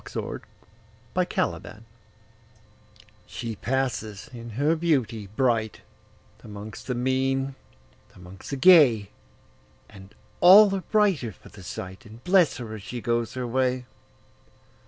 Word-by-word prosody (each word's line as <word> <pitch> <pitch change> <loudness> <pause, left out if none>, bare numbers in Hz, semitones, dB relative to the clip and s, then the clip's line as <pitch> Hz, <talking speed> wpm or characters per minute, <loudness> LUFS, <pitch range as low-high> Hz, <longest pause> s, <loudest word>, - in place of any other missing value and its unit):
1840 - - -6 1.2
The - - -11
Secret 110 - -17 1.4
SHE 115 -2 -6
passes 115 -6 -3
in 120 -1 -9
her 150 +4 +2
beauty 130 - -1
brightAmongst 110 -3 -5
the 125 - -2
mean, 135 +2 0 0.6
amongst 90 +1 -12
the 140 - -3
gay, 135 - +5 0.8
And 95 -2 -15 0.2
all 195 +3 +8
are 195 - -2
brighter 190 - +1
for - - -17
the 100 - -14
sight, 95 +5 -8
And 110 +3 -14
bless 180 -5 +3
her 115 -3 -7
as 110 - -8
she 120 +5 -6
goes 115 0 -2
her 125 -1 -3
way. 125 +1 -1
120 Hz, 115 wpm, -25 LUFS, 110-135 Hz, 1.4 s, all